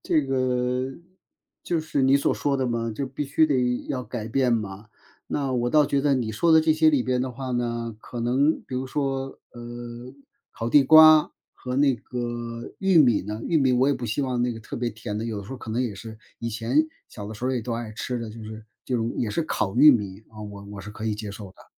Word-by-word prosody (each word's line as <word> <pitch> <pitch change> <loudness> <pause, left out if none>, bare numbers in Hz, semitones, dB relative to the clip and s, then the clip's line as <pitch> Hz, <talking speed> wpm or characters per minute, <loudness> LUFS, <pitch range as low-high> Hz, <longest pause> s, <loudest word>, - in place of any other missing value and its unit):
这 155 - +2
个， 130 -1 0 0.7
就 170 - -1
是 155 -2 -2
你 135 +1 +5
所 140 - +1
说 140 -1 0
的 130 -1 0
嘛， 115 -1 -1
这 140 - -2
必 135 +2 -5
须 150 +3 +3
得 125 -4 0
要 125 - -2
改 115 -2 -6
变 125 +2 +1
嘛？ 105 -2 -2 0.4
那 140 -2 -2
我 120 -1 0
倒 150 +2 +4
觉 140 0 +1
得 140 0 +2
你 120 -4 -1
说 165 +11 +1
的 160 -1 +7
这 160 -1 +4
些 160 0 +4
里 145 -5 +3
边 125 0 0
的 130 0 -2
话 130 +1 -6
呢， 120 -2 -2
可 120 - -7
能 135 +6 +2
比 130 - -8
如 130 +1 -2
说， 135 -1 -3
呃， 120 +1 -9 0.4
烤 115 0 -4
地 145 - +7
瓜 155 +1 +8 0.2
和 125 0 -5
那 140 -1 +4
个 120 -1 -6
玉 190 -2 +2
米 125 -9 +5
呢， 105 +3 -6
玉 165 - +2
米 135 -3 +3
我 125 +2 +3
也 145 - +3
不 120 -3 -4
希 110 +7 -1
望 125 -2 -1
那 125 - +1
个 115 - -6
特 - - -9
别 120 0 -1
甜 105 -1 -6
的， 115 - -3
有 110 -2 -3
的 100 - -7
时 100 - -12
候 135 - -6
可 110 - -8
能 120 +3 0
也 115 -5 -3
是 110 +2 -10 0.2
以 115 - -3
前 120 +8 +1 0.2
小 105 - -9
的 110 - -7
时 115 - -7
候 130 - +1
也 125 -2 -1
都 115 +1 -3
爱 115 -2 -5
吃 125 +1 -4
的， 115 -2 -6
就 110 0 -10
是 110 0 -9 0.2
这 125 - -2
种 115 0 -1
也 115 - 0
是 135 +11 -1
烤 100 -9 -2
玉 150 +4 +9
米， 100 -5 -1
啊， 110 -1 -12
我 100 -1 -8
我 100 - -7
是 95 - -10
可 110 +1 -8
以 110 - 0
接 105 -1 -6
受 100 -1 -9
的。 - - -19
125 Hz, 265 characters per minute, -25 LUFS, 115-135 Hz, 0.7 s, 玉